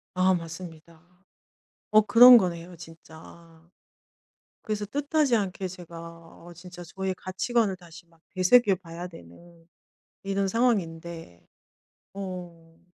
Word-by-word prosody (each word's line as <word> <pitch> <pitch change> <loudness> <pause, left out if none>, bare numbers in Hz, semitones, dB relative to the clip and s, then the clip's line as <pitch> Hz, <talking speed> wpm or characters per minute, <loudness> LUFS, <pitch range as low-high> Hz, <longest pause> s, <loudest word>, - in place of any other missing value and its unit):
아 185 0 +3
맞습니다. 165 -1 -9 0.9
어 215 0 +6
그런 245 +3 +8
거네요 175 -2 -3
진짜. 165 0 -15 0.9
그래서 210 -1 -3
뜻하지 290 +1 0
않게 190 -2 -3
제가 175 -2 -11 0.5
어 175 - -12
진짜 175 +1 -12
저의 190 +2 -4
가치관을 195 +2 -1
다시 170 -1 -15
막 165 -1 -28
되새겨 195 +2 +4
봐야 170 -1 -9
되는 165 - -16 0.6
이런 195 0 -1
상황인데 170 -8 -2 0.7
어. 175 -4 -9
180 Hz, 225 characters per minute, -26 LUFS, 165-195 Hz, 0.9 s, 그런